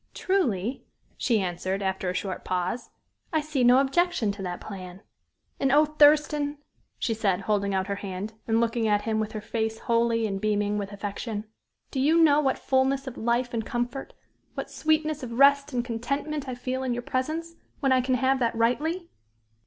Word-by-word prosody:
"Truly," 255 - 0 0.3
she 230 -3 +1
answered, 185 +1 -2
after 190 -1 -1
a 180 - -3
short 190 -1 -3
pause. 185 +6 -2 0.4
"I 315 - +2
see 300 -4 -1
no 245 +1 +7
objection 275 - +2
to 200 0 -8
that 180 -2 -4
plan. 185 -1 -9 0.6
And, 270 - +2
oh! 300 +2 +6
Thurston," 300 -1 +4 0.4
she 225 - 0
said, 200 -4 0
holding 200 -1 0
out 190 0 +1
her 200 0 -3
hand, 200 +2 -5
and 225 0 +2
looking 230 -1 +1
at 205 -1 +2
him 220 -1 0
with 215 +1 -2
her 215 - -4
face 220 +1 -2
holy 230 0 +1
and 195 -2 -3
beaming 210 -1 +1
with 200 0 -5
affection, 205 +2 -4 0.5
"do 270 - -2
you 300 +5 +4
know 300 -3 +6
what 270 -3 +1
fullness 265 +1 +1
of 260 -2 -6
life 240 +2 0
and 225 -1 -1
comfort 240 +4 -4 0.4
what - - -5
sweetness 310 -1 0
of 240 -3 -6
rest 280 +3 +5
and 245 -2 -1
contentment 275 +5 -3
I 255 - -3
feel 255 +1 -3
in 255 -2 -1
your 245 - -4
presence, 315 +7 -2 0.3
when 270 - +1
I 255 -1 +5
can 255 0 +1
have 265 +2 +2
that 235 -2 +1
rightly?" 305 +10 0
240 Hz, 185 wpm, -26 LUFS, 210-275 Hz, 0.6 s, no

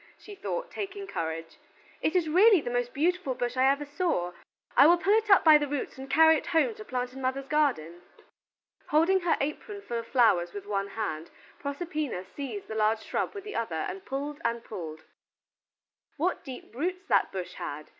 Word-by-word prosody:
she 415 - -12
thought, - - -4
taking 400 0 -5
courage: 165 - -5 0.4
"it 315 - 0
is 350 -3 +2
really 385 +5 +6
the 240 - -4
most 245 0 -1
beautiful 325 -2 0
bush 245 0 -2
I 260 +1 +4
ever 280 +1 0
saw. 285 - -1 0.4
I 275 - +8
will 345 +2 +6
pull 390 +4 +2
it 435 0 +2
up 395 - +7
by 310 -2 +8
the 295 - -1
roots 280 -1 -4
and 265 0 -8
carry 320 0 +6
it - - -7
home 340 +8 +2
to 430 0 -10
plant 250 -8 -3
in 270 - -8
mother's 265 +1 -1
garden." 215 - 0 0.9
Holding 330 +6 +4
her 350 -2 +1
apron 400 +8 -4
full 235 -1 -3
of 230 - -8
flowers 195 -10 +3
with 200 -1 -7
one 200 -1 -1
hand, 195 -6 -4 0.3
Proserpina 290 - -3
seized 230 -1 -7
the - - -6
large 220 0 +1
shrub - - -2
with 400 - -6
the 420 0 -7
other 220 -8 -2
and 185 +4 -4
pulled 290 +3 -5
and 235 -3 -1
pulled. 160 -6 -7 1.1
What 350 +5 -1
deep 260 -4 -9
roots 365 +8 -3
that - - +3
bush 185 -2 -5
had! 150 +1 -6
275 Hz, 195 wpm, -28 LUFS, 220-345 Hz, 1.1 s, I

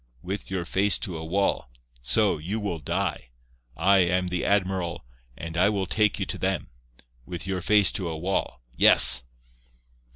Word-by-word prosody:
With 95 +2 -5
your 95 -2 -3
face 100 +4 +1
to 90 - -5
a 80 - -6
wall. 95 -4 -1 0.3
So, 80 - +1
you 95 +8 -4
will 100 -6 -4
die. 70 -4 -3 0.5
I 95 +4 +4
am 90 0 +1
the 90 0 -3
admiral, 95 -6 -1 0.3
and 80 +1 -7
I 90 +4 +3
will 100 -2 -1
take 105 +4 +1
you 95 - -2
to 95 0 -4
them. 95 -3 -2 0.6
With 90 0 -6
your 95 -1 -3
face 105 0 +3
to 90 -4 -3
a 80 - -5
wall. 85 -7 -3
Yes." 60 - +6
95 Hz, 165 wpm, -25 LUFS, 85-100 Hz, 0.6 s, Yes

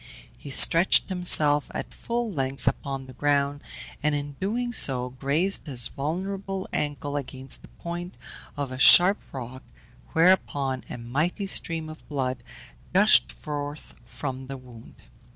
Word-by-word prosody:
He 145 - -11
stretched 165 +9 +5
himself 155 -5 +3
at - - -5
full 235 -1 -3
length 135 -4 -4
upon 135 -2 -2
the 130 - -12
ground, 145 +1 0 0.4
and 150 0 +1
in 145 -1 -5
doing 240 +5 -2
so 125 - +4
grazed 150 +9 0
his 125 -4 +1
vulnerable 190 +6 -4
ankle 145 -1 -3
against 135 -1 -5
the - - -15
point 175 +1 -8 0.4
of 140 -2 -4
a 130 - -7
sharp 180 +8 +8
rock, 130 0 -8 0.5
whereupon 145 -6 +2
a - - -6
mighty 150 - -2
stream 165 -4 +1
of 155 0 -12
blood 130 -4 -3 0.5
gushed - - +5
forth 145 - -7
from 130 +2 -7
the 135 0 -6
wound. 125 -3 -15
145 Hz, 135 wpm, -25 LUFS, 130-175 Hz, 0.5 s, sharp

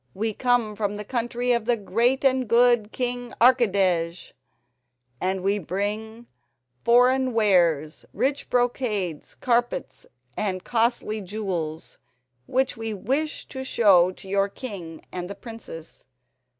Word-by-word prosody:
We 220 +2 -1
come 245 -3 +1
from 205 -1 -2
the 210 - -5
country 240 +1 -1
of 235 -2 +1
the 240 0 +2
great 235 +7 +1
and 260 -2 +2
good 235 -2 +4
King 245 -1 -2
Archidej, 195 -9 +2 0.9
and 190 +1 -1
we 200 +2 +1
bring 210 +6 -4 0.6
foreign 255 +2 +4
wares—rich 180 - +1
brocades, 230 - -1
carpets, 240 -1 -1 0.3
and 185 -3 -2
costly 230 -2 0
jewels, 180 -6 -5 0.5
which 260 0 0
we 225 -2 -4
wish 280 +10 -2
to 265 -1 -6
show 195 -8 +4
to 190 - -14
your 200 +1 +1
king 195 -8 -7
and 180 0 -5
the 200 - -6
princess. 225 - -10
220 Hz, 120 wpm, -24 LUFS, 190-245 Hz, 0.9 s, good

